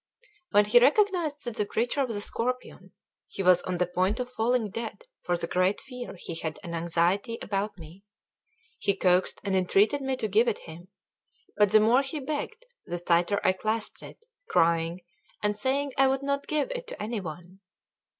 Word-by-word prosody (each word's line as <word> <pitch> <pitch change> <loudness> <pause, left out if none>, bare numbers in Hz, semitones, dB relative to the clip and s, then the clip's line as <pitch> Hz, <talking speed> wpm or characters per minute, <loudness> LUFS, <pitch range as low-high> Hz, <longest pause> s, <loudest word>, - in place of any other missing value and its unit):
When 205 0 +5
he 230 +4 +6
recognised 320 - +2
that 240 -2 -5
the 210 - +1
creature 245 +7 0
was 230 - -4
a 205 - -3
scorpion, 250 +4 -4 0.4
he 195 - -5
was 180 -1 +5
on 180 -1 -3
the 180 - +2
point 185 +6 0
of 250 0 -4
falling 225 -2 +1
dead 230 - -6 0.2
for 175 -1 0
the 170 - -3
great 185 +3 +1
fear 250 -5 -8
he 170 - -7
had 160 -1 -4
and 170 -2 -6
anxiety 170 +6 0
about 200 +1 -3
me. 170 +3 -13 0.8
He 200 - +1
coaxed 185 -1 +2
and 195 -2 0
entreated 200 +9 +3
me 265 -1 -1
to 220 - -2
give 215 +4 +3
it 230 - +1
him; 170 +2 -11 0.7
but 205 -2 +4
the 215 - +7
more 230 +5 +4
he 280 +3 -5
begged, 310 - -4 0.2
the 175 - -4
tighter 175 +3 +2
I - - +5
clasped 215 +3 -3
it, - - -12 0.3
crying 165 - +2 0.4
and 210 0 +1
saying 270 +5 -1
I 270 - +6
would 270 +1 0
not 280 0 -1
give 305 +11 0
it - - -5
to - - -8
any 220 +1 -3
one. 175 +2 -9
210 Hz, 190 wpm, -27 LUFS, 180-260 Hz, 0.8 s, the